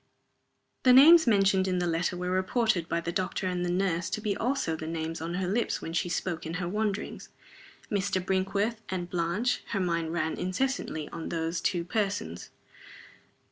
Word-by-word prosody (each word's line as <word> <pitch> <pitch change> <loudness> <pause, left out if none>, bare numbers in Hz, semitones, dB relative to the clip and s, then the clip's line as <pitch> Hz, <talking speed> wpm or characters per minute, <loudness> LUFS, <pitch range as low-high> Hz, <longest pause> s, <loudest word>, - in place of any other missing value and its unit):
The 255 - +6
names 320 +4 +8
mentioned 195 -3 +4
in 185 -1 0
the 180 - 0
letter 175 +1 0
were 180 0 -2
reported 185 -1 +1
by 170 - 0
the 170 - -3
doctor 185 +1 -2
and 180 -1 -1
the 175 - -1
nurse 175 -2 0
to - - -2
be 210 -2 -1
also 245 -9 -1
the 160 0 -6
names 165 0 -4
on 170 +2 -3
her 185 0 -1
lips 225 +6 0
when 165 - -6
she 175 +1 0
spoke 175 -1 -2
in 165 +1 -5
her 180 -1 -2
wanderings. 210 +1 -3 0.6
"Mr. 200 -2 0
Brinkworth" 195 +4 -1
and 180 -2 -4
"Blanche" 180 +8 0
her 200 - +1
mind 170 -3 -1
ran 160 -1 -1
incessantly 185 - -2
on 165 - -6
those 165 0 -2
two 175 -2 0
persons. 180 - -2
180 Hz, 180 wpm, -28 LUFS, 170-200 Hz, 0.6 s, names